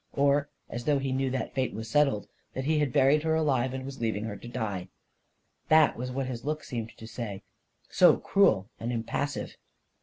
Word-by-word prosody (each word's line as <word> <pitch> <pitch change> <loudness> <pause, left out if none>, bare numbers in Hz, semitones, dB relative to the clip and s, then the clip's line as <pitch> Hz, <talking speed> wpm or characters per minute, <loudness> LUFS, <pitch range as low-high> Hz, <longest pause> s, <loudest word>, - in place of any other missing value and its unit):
Or 140 0 +2 0.2
as 120 +1 -6
though 150 -2 +3
he 135 -1 -2
knew 135 0 0
that 130 0 -3
fate 130 -1 -1
was 110 +1 -5
settled 135 -3 +2
— - - -42
that 130 - -2
he 155 +2 +2
had 145 -4 +1
buried 140 +3 +4
her 160 0 +1
alive 135 -5 +1
and 130 0 -5
was 135 -2 -8
leaving 110 -2 -1
her 110 -2 -4
to 100 +4 -10
die! 100 -6 -3 0.8
That 155 0 +6
was 125 +2 -4
what 135 +1 -2
his 125 -2 -5
look 155 +1 -2
seemed 115 -2 -6
to 110 - -10
say, 115 -3 -6 0.4
so - - +6
cruel 110 - +3
and 115 +2 -3
impassive 125 +5 -3
130 Hz, 205 wpm, -28 LUFS, 115-140 Hz, 0.8 s, That